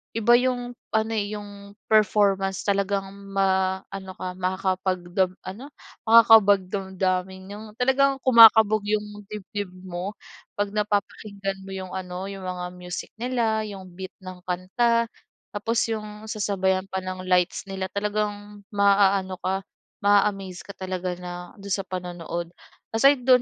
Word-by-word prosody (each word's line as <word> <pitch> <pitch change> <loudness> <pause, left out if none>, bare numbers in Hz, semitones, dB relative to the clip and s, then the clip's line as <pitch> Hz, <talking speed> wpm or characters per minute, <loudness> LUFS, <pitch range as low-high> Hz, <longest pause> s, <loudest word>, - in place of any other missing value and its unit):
iba 225 +1 +2
yung 245 -1 -1 0.2
ano 220 +1 +1
yung 205 -1 -3 0.4
performance 195 -2 +3
talagang 200 -1 0 0.2
ma-ano 190 0 0
ka 185 - -4
makakapag 185 0 -1
dam 185 -1 +2
ano, 215 +9 -7 0.4
makakabagdamdamin 190 -4 +4
yung 210 +2 -8
talagang 270 +2 +3
kumakabog 220 -3 +8
yung 210 0 +1 0.2
dibdib 205 -2 -5
mo 185 +3 -5 0.4
pag 205 0 -1
napapakinggan 200 -1 -2
mo - - -8
yung 185 -1 -6
ano 185 0 -5
yung 195 -1 -8
mga 180 -1 -4
music 180 -1 -6
nila 230 -3 0
yung 190 -3 -9
beat 190 +1 -8
ng 185 -1 -8
kanta 230 +6 +1 0.5
tapos 225 +2 0
yung 215 -1 -5
sasabayan 190 -2 0
pa 190 -1 -4
ng 185 0 -5
lights 180 +1 +1
nila 190 -1 -3
talagang 205 0 -3
maaano 200 -2 +3
ka 190 +1 -1 0.4
ma 205 0 +6
a-amaze 195 -3 -4
ka 200 - -9
talaga 185 -1 -3
na 180 0 -7
do'n 200 0 -8
sa 195 - 0
panonood. 175 -2 -5 0.4
Aside 275 +2 +5
do'n 255 -1 +6
195 Hz, 130 wpm, -25 LUFS, 185-210 Hz, 0.5 s, kumakabog